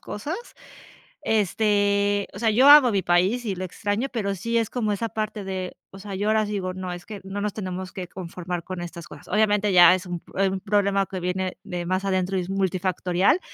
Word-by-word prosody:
cosas. 295 Hz, -, -5 dB, 0.9 s
Este, 205 Hz, -1 st, +1 dB
o 200 Hz, -, -8 dB
sea, 225 Hz, 0 st, +2 dB
yo 255 Hz, +6 st, +5 dB
amo 290 Hz, -4 st, +9 dB
mi 200 Hz, -2 st, +1 dB
país, 185 Hz, +8 st, +2 dB
y 200 Hz, -, -1 dB
lo 185 Hz, 0 st, -5 dB
extraño, 205 Hz, +6 st, -2 dB
pero 200 Hz, -4 st, -1 dB
sí, 230 Hz, +5 st, -2 dB
es 225 Hz, -2 st, 0 dB
como 225 Hz, -4 st, -1 dB
esa 225 Hz, +3 st, -3 dB
parte 215 Hz, -1 st, -4 dB
de 190 Hz, -1 st, -5 dB
o 195 Hz, -, -12 dB
sea, 200 Hz, 0 st, -8 dB
yo 205 Hz, +2 st, -2 dB
ahora 215 Hz, 0 st, +3 dB
sí 210 Hz, -, -6 dB
digo: 185 Hz, -2 st, -2 dB
"No, 185 Hz, -1 st, -5 dB
es 175 Hz, 0 st, -9 dB
que 210 Hz, -2 st, -8 dB
no 195 Hz, +1 st, -5 dB
nos 210 Hz, -1 st, -2 dB
tenemos 185 Hz, -2 st, -5 dB
que 185 Hz, -2 st, -6 dB
conformar 180 Hz, -1 st, -6 dB
con 185 Hz, 0 st, -6 dB
estas 170 Hz, -2 st, -8 dB
cosas". -, -, -13 dB
Obviamente, 210 Hz, -1 st, +2 dB
ya 175 Hz, -1 st, +8 dB
es 185 Hz, -, -6 dB
un 175 Hz, -1 st, -4 dB
p -, -, -21 dB
eh, 195 Hz, 0 st, +3 dB
un 190 Hz, 0 st, -3 dB
problema 200 Hz, -1 st, +1 dB
que 190 Hz, -, -5 dB
viene 180 Hz, +1 st, -2 dB
de 175 Hz, -1 st, -5 dB
más 185 Hz, +1 st, -1 dB
adentro 185 Hz, 0 st, 0 dB
y -, -, +1 dB
es 180 Hz, -, -7 dB
multifactorial. 185 Hz, -, +1 dB
195 Hz, 225 wpm, -24 LUFS, 185-210 Hz, 0.9 s, amo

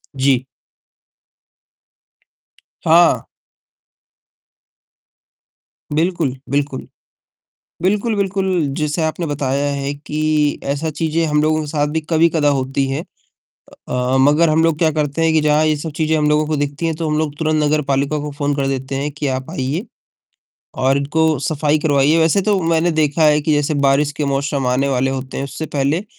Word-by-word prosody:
जी। 130 Hz, -1 st, +1 dB, 2.4 s
हाँ। 165 Hz, +1 st, +5 dB, 2.7 s
बिल्कुल, 160 Hz, -4 st, 0 dB
बिल्कुल। 140 Hz, -1 st, -2 dB, 0.9 s
बिल्कुल, 210 Hz, +4 st, +1 dB
बिल्कुल 190 Hz, -4 st, 0 dB
जैसे 150 Hz, +1 st, -1 dB
आपने 160 Hz, +2 st, -2 dB
बताया 140 Hz, -1 st, -1 dB
है 140 Hz, 0 st, -3 dB
कि 150 Hz, 0 st, -1 dB
ऐसा 145 Hz, +3 st, -2 dB
चीज़ें 160 Hz, +2 st, -1 dB
हम 150 Hz, -1 st, +1 dB
लोगों 155 Hz, 0 st, +1 dB
के 150 Hz, -, -6 dB
साथ 145 Hz, -1 st, 0 dB
भी 160 Hz, -, +1 dB
कभी-कदा 160 Hz, -2 st, +3 dB
होती 135 Hz, 0 st, 0 dB
हैं 140 Hz, +4 st, -2 dB, 0.9 s
अ, 125 Hz, +1 st, 0 dB
मगर 150 Hz, +4 st, +4 dB
हम 155 Hz, +1 st, +3 dB
लोग 165 Hz, -2 st, +2 dB
क्या 160 Hz, -1 st, +3 dB
करते 150 Hz, +1 st, -1 dB
हैं 160 Hz, 0 st, +3 dB
कि 160 Hz, -, +3 dB
जहाँ 150 Hz, +1 st, +3 dB
ये 155 Hz, -1 st, +2 dB
सब 155 Hz, +2 st, -5 dB
चीज़ें 160 Hz, 0 st, +1 dB
हम 150 Hz, -1 st, +1 dB
लोगों 150 Hz, 0 st, +2 dB
को 155 Hz, -1 st, -1 dB
दिखती 145 Hz, +3 st, -2 dB
हैं, 165 Hz, -, -1 dB
तो 160 Hz, -1 st, -2 dB
हम 150 Hz, -, 0 dB
लोग 150 Hz, -2 st, -2 dB
तुरंत 155 Hz, -1 st, +1 dB
नगरपालिका 145 Hz, 0 st, 0 dB
को 150 Hz, 0 st, -5 dB
फ़ोन 145 Hz, 0 st, -1 dB
कर 135 Hz, -1 st, 0 dB
देते 135 Hz, 0 st, -3 dB
हैं 145 Hz, +2 st, -2 dB
कि 150 Hz, 0 st, -4 dB
आप 130 Hz, +3 st, -3 dB
आइए 155 Hz, -, -3 dB, 0.9 s
और 135 Hz, +1 st, +2 dB
इनको 155 Hz, +1 st, +1 dB
सफ़ाई 150 Hz, 0 st, 0 dB
करवाइए, 145 Hz, +1 st, +2 dB
वैसे 165 Hz, +4 st, +3 dB
तो 205 Hz, 0 st, +2 dB
मैंने 165 Hz, +1 st, +2 dB
देखा 155 Hz, 0 st, +1 dB
है 150 Hz, 0 st, +4 dB
कि 155 Hz, +1 st, 0 dB
जैसे 150 Hz, +1 st, +1 dB
बारिश 145 Hz, +2 st, +2 dB
के 150 Hz, -, -1 dB
मौसम 140 Hz, -1 st, -1 dB
आने 130 Hz, +3 st, +1 dB
वाले 135 Hz, 0 st, +1 dB
होते 130 Hz, 0 st, -5 dB
हैं, 135 Hz, -, -2 dB
उससे 155 Hz, +4 st, -6 dB
पहले 145 Hz, +8 st, 0 dB
150 Hz, 165 wpm, -18 LUFS, 140-160 Hz, 2.7 s, हाँ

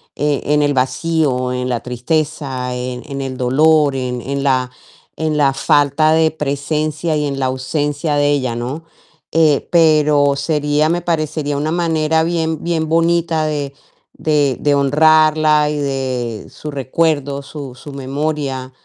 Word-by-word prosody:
eh, 145 Hz, -1 st, 0 dB
en 150 Hz, +1 st, +2 dB
el 145 Hz, -1 st, +2 dB
vacío, 130 Hz, -1 st, 0 dB
en 125 Hz, 0 st, -2 dB
la 120 Hz, -2 st, -1 dB
tristeza, 130 Hz, 0 st, -2 dB
en 125 Hz, 0 st, -4 dB
en 140 Hz, 0 st, -4 dB
el 130 Hz, -1 st, -5 dB
dolor, 145 Hz, +3 st, +3 dB
en 125 Hz, -2 st, -3 dB
en 140 Hz, +2 st, -3 dB
la 130 Hz, -2 st, +1 dB, 0.5 s
en 155 Hz, -1 st, -1 dB
la 140 Hz, -2 st, +3 dB
falta 145 Hz, +2 st, +2 dB
de 160 Hz, 0 st, +3 dB
presencia 155 Hz, +2 st, -2 dB
y 150 Hz, -, -1 dB
en 140 Hz, -1 st, -3 dB
la 130 Hz, -, +1 dB
ausencia 145 Hz, +3 st, -2 dB
de 145 Hz, 0 st, +2 dB
ella, 130 Hz, -5 st, -1 dB
¿no? 130 Hz, +7 st, -5 dB, 0.5 s
Eh, 155 Hz, -3 st, +2 dB
pero 150 Hz, -4 st, +4 dB
sería 150 Hz, +1 st, 0 dB
me 175 Hz, +1 st, 0 dB
parecería 155 Hz, -3 st, -2 dB
una 150 Hz, +2 st, -1 dB
manera 160 Hz, -2 st, +1 dB
bien 160 Hz, -2 st, -1 dB
bien 165 Hz, -2 st, -1 dB
bonita 165 Hz, -1 st, +1 dB
de 145 Hz, -2 st, -3 dB, 0.4 s
de 145 Hz, -4 st, +1 dB
de 145 Hz, -1 st, +2 dB
honrarla 155 Hz, +1 st, +4 dB
y 150 Hz, -, -2 dB
de 130 Hz, -5 st, -3 dB
su 150 Hz, -, -8 dB
recuerdo, 140 Hz, 0 st, -1 dB
su 140 Hz, -2 st, -8 dB
su 145 Hz, +3 st, -11 dB
memoria, 135 Hz, -1 st, -3 dB
145 Hz, 150 wpm, -17 LUFS, 135-155 Hz, 0.5 s, pero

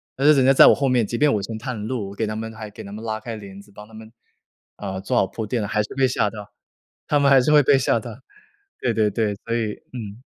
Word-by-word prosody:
但 135 Hz, -, -2 dB
是 155 Hz, -, +8 dB
人 135 Hz, -2 st, +3 dB
家 135 Hz, -, +6 dB
在 -, -, +8 dB
我 -, -, +7 dB
后 140 Hz, -1 st, 0 dB
面， 125 Hz, -3 st, +2 dB
即 120 Hz, -, -5 dB
便 145 Hz, +1 st, +3 dB
我 105 Hz, -, +1 dB
先 115 Hz, -, -5 dB
探 120 Hz, -4 st, -5 dB
路， 115 Hz, -7 st, -3 dB
我 100 Hz, -, -10 dB
给 110 Hz, -, -1 dB
他 110 Hz, 0 st, -4 dB
们 110 Hz, +1 st, -5 dB
还 110 Hz, -1 st, -8 dB
给 -, -, -10 dB
他 100 Hz, -, -10 dB
们 110 Hz, +2 st, -8 dB
拉 110 Hz, -1 st, -3 dB
开 115 Hz, +1 st, -7 dB
帘 100 Hz, -2 st, -10 dB
子， 100 Hz, -, -20 dB
帮 105 Hz, +1 st, -12 dB
他 110 Hz, -, -19 dB
们 110 Hz, 0 st, -12 dB, 0.7 s
啊， 95 Hz, -2 st, -5 dB
做 95 Hz, -, -2 dB
好 -, -, +3 dB
铺 110 Hz, -2 st, -5 dB
垫 115 Hz, 0 st, -2 dB
了， 105 Hz, -, -3 dB
还 105 Hz, -, 0 dB
是 105 Hz, -, -8 dB
被 135 Hz, -1 st, +2 dB
吓 105 Hz, -, 0 dB
到， 105 Hz, -1 st, -10 dB, 0.6 s
他 145 Hz, -, +2 dB
们 140 Hz, -1 st, +3 dB
还 135 Hz, -1 st, +7 dB
是 130 Hz, +4 st, +1 dB
会 150 Hz, -1 st, +7 dB
被 135 Hz, 0 st, +4 dB
吓 130 Hz, -, +1 dB
到。 -, -, -9 dB, 0.6 s
对 125 Hz, -, +1 dB
对 105 Hz, -1 st, +2 dB
对， 105 Hz, -1 st, -1 dB
所 115 Hz, 0 st, -2 dB
以 110 Hz, -3 st, -1 dB, 0.2 s
嗯。 110 Hz, -1 st, -8 dB
110 Hz, 315 characters per minute, -22 LUFS, 105-125 Hz, 0.7 s, 是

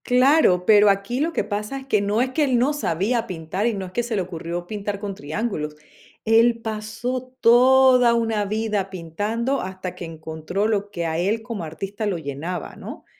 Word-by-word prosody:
Claro, 250 Hz, -, +4 dB
pero 210 Hz, 0 st, +6 dB
aquí 200 Hz, +5 st, 0 dB
lo 320 Hz, +3 st, +1 dB
que -, -, -1 dB
pasa 210 Hz, +5 st, -4 dB
es 265 Hz, -, -12 dB
que 215 Hz, -6 st, +2 dB
no 205 Hz, +3 st, +1 dB
es 255 Hz, 0 st, 0 dB
que 305 Hz, +3 st, +1 dB
él 260 Hz, -4 st, +2 dB
no 260 Hz, +5 st, +2 dB
sabía 230 Hz, -, -1 dB
pintar, 180 Hz, +4 st, -3 dB
y 235 Hz, -, +1 dB
no 195 Hz, -1 st, -4 dB
es 180 Hz, -, -10 dB
que 240 Hz, -, 0 dB
se 235 Hz, -1 st, -3 dB
le 190 Hz, -, 0 dB
ocurrió 175 Hz, 0 st, -5 dB
pintar 205 Hz, 0 st, -4 dB
con 200 Hz, -1 st, -4 dB
triángulos, 155 Hz, -2 st, -4 dB, 0.5 s
él 230 Hz, +1 st, +4 dB
pasó 230 Hz, +4 st, -4 dB
toda 250 Hz, +1 st, +6 dB
una 225 Hz, -3 st, 0 dB
vida 210 Hz, -2 st, -1 dB
pintando 205 Hz, -, -2 dB
hasta 185 Hz, -1 st, -6 dB
que 180 Hz, -, -7 dB
encontró 160 Hz, +5 st, -3 dB
lo 205 Hz, -2 st, -1 dB
que 170 Hz, -4 st, -4 dB
a 160 Hz, 0 st, -1 dB
él 210 Hz, +5 st, 0 dB
como 225 Hz, -6 st, -5 dB
artista 195 Hz, +7 st, -5 dB
lo 195 Hz, -4 st, -1 dB
llenaba, 160 Hz, +4 st, -5 dB
¿no? -, -, -9 dB
210 Hz, 195 wpm, -23 LUFS, 180-235 Hz, 0.5 s, pero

